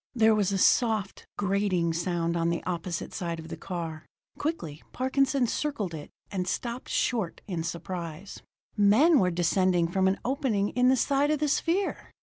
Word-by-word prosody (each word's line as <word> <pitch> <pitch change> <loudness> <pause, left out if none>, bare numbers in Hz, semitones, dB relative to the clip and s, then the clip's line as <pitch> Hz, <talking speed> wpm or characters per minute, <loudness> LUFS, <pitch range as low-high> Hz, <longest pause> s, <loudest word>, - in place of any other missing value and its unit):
There 220 -2 +5
was 205 -2 +1
a 195 - 0
soft, 215 -1 +2
grating 195 -4 +1
sound 170 0 -1
on 165 0 +1
the 170 - -2
opposite 170 -1 -4
side 170 -2 -3
of 160 0 -9
the - - -5
car. 165 -4 -6 0.3
Quickly, 165 - -3
Parkinson 265 0 +1
circled 230 - -2
it 150 -2 -7 0.2
and 185 -3 -2
stopped 235 +5 -3
short 220 -9 -1
in 175 -5 -3
surprise. 170 +1 -6 0.3
Men 245 +10 +5
were 185 - +3
descending 175 0 +2
from 190 +2 +1
an 190 - +2
opening 245 -7 0
in 250 0 +2
the 260 - +5
side 280 +3 +2
of 305 - +2
the 300 +1 0
sphere! 345 +7 0
195 Hz, 165 wpm, -28 LUFS, 170-250 Hz, 0.3 s, There